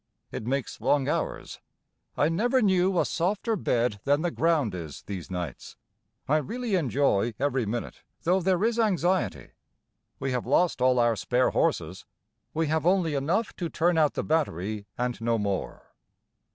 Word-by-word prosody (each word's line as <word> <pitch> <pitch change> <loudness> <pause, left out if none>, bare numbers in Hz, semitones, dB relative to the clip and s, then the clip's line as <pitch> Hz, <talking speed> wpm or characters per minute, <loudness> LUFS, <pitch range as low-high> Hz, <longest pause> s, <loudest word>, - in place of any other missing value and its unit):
It 110 - -5
makes 135 0 -2
long 140 -2 +2
hours. - - -3 0.6
I 145 - +3
never 235 +11 +2
knew 185 -2 +3
a - - +3
softer 205 +6 0
bed 120 - 0
than 145 +3 +2
the 175 - 0
ground 155 - +1
is 80 -5 -7
these 95 -4 -6
nights. 90 -7 -6 0.5
I 150 - +3
really 230 - -3
enjoy 130 - +1
every 135 -4 0
minute 120 +3 -4 0.2
though 180 +3 +2
there 185 +1 +1
is 230 +1 +1
anxiety. 180 - 0 0.7
We 135 0 -2
have 125 -2 -2
lost 165 +1 +2
all 130 0 +4
our 120 -1 +3
spare 125 +5 +1
horses. - - -1 0.5
We 160 +1 0
have 160 +1 0
only 180 -4 +2
enough 170 +11 0
to 170 -3 -3
turn 170 +1 +2
out 150 -2 +3
the - - -1
battery 105 - -1
and 125 -1 -2
no 115 0 +1
more. 100 -3 -4
145 Hz, 160 wpm, -27 LUFS, 120-180 Hz, 0.7 s, all